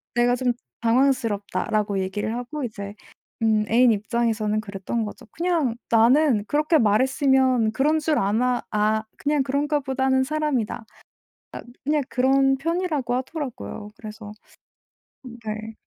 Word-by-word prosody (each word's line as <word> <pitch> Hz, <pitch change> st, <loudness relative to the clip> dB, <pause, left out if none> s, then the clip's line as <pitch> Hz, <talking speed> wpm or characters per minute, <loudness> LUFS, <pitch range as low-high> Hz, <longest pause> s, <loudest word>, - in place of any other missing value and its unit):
내가 240 Hz, +1 st, +3 dB
좀 250 Hz, -1 st, +1 dB, 0.3 s
당황스럽다."라고 230 Hz, -4 st, +1 dB
얘기를 190 Hz, +3 st, -2 dB
하고 270 Hz, +4 st, -5 dB
이제 205 Hz, -4 st, -6 dB, 0.5 s
음 215 Hz, -1 st, +3 dB
애인 240 Hz, +2 st, +5 dB
입장에서는 215 Hz, 0 st, 0 dB
그랬던 205 Hz, +2 st, -4 dB
거죠. 210 Hz, -, -9 dB
"그냥 330 Hz, -8 st, 0 dB, 0.2 s
나는 235 Hz, 0 st, +4 dB
그렇게 305 Hz, +2 st, +2 dB
말했으면 260 Hz, 0 st, +3 dB
그런 300 Hz, +6 st, +2 dB
줄 305 Hz, -1 st, 0 dB
아나 240 Hz, +5 st, +1 dB
아 215 Hz, +1 st, +1 dB
그냥 290 Hz, -1 st, +1 dB
그런가 290 Hz, +2 st, 0 dB
보다는 265 Hz, -1 st, +1 dB
사람이다." 295 Hz, -5 st, -1 dB
아 220 Hz, -3 st, -20 dB, 0.8 s
그냥 295 Hz, +1 st, +1 dB
그런 270 Hz, +2 st, +3 dB
편이라고 315 Hz, -5 st, -1 dB
하더라고요. 260 Hz, -5 st, -5 dB
그래서 215 Hz, -1 st, -9 dB, 1.1 s
네. 215 Hz, +1 st, -5 dB
245 Hz, 290 characters per minute, -24 LUFS, 215-275 Hz, 1.1 s, 애인